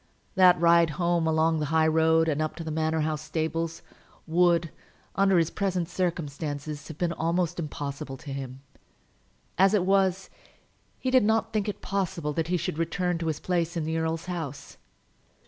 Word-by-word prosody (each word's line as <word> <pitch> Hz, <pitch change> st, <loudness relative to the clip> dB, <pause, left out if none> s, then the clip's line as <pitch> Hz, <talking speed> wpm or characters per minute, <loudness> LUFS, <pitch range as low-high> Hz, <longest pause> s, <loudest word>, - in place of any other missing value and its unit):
That 180 Hz, -3 st, +6 dB
ride 170 Hz, -1 st, +5 dB
home 170 Hz, -2 st, +1 dB
along 160 Hz, 0 st, +2 dB
the 150 Hz, -, -1 dB
high 160 Hz, +1 st, +3 dB
road 160 Hz, +1 st, +3 dB
and 155 Hz, -1 st, 0 dB
up 155 Hz, -, -2 dB
to 165 Hz, -, -6 dB
the 160 Hz, -, -5 dB
Manor 160 Hz, 0 st, 0 dB
House 155 Hz, 0 st, -1 dB
stables 165 Hz, +1 st, -3 dB, 0.4 s
would, 170 Hz, -1 st, +2 dB, 0.4 s
under 195 Hz, -1 st, +4 dB
his 165 Hz, -1 st, +2 dB
present 185 Hz, -4 st, -1 dB
circumstances, 150 Hz, -4 st, -3 dB
have 160 Hz, -, -9 dB
been 170 Hz, 0 st, 0 dB
almost 170 Hz, +1 st, -1 dB
impossible 145 Hz, -3 st, -5 dB
to 140 Hz, +1 st, -8 dB
him. 135 Hz, -1 st, -7 dB, 1.0 s
As 195 Hz, +2 st, +5 dB
it 185 Hz, -3 st, +2 dB
was, 195 Hz, -1 st, +1 dB, 0.7 s
he 260 Hz, -, -2 dB
did 255 Hz, -3 st, +5 dB
not 220 Hz, +1 st, +1 dB
think 210 Hz, -1 st, 0 dB
it 205 Hz, -, -6 dB
possible 185 Hz, -6 st, -2 dB
that 165 Hz, +1 st, -1 dB
he 180 Hz, +1 st, +1 dB
should 155 Hz, -1 st, -3 dB
return 175 Hz, +1 st, -1 dB
to 165 Hz, -, -3 dB
his 155 Hz, -2 st, -1 dB
place 170 Hz, -1 st, -1 dB
in 165 Hz, -, -1 dB
the 160 Hz, +1 st, -1 dB
earl's 160 Hz, 0 st, -2 dB
house. 165 Hz, -6 st, -6 dB
165 Hz, 175 wpm, -27 LUFS, 155-180 Hz, 1.0 s, That